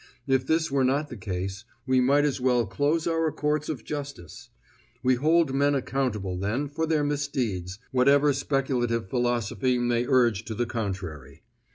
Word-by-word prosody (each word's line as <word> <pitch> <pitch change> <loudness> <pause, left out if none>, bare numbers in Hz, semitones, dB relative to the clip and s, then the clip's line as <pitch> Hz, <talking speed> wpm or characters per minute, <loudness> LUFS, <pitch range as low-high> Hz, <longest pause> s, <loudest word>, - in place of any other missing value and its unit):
If 130 -1 +1
this 160 -1 +1
were 135 -1 +2
not 140 +3 +1
the - - -7
case, 95 0 -4 0.2
we 130 -1 +3
might 140 +3 +3
as 140 -3 -1
well 125 -2 +2
close 145 - 0
our 165 -1 +1
courts 150 +1 -1
of 135 -8 -4
justice. 140 - -7 0.5
We 130 0 +4
hold 155 +3 +2
men 140 +1 +2
accountable, 110 -9 -2
then, 115 +9 -1
for 160 +3 -2
their 155 -2 +1
misdeeds, 125 -11 -2
whatever 140 +3 +4
speculative 130 -5 -1
philosophy 120 +1 0
may 120 0 0
urge 120 -6 +3
to 110 - -5
the 120 - 0
contrary. 95 - -5
130 Hz, 160 wpm, -26 LUFS, 115-145 Hz, 0.5 s, We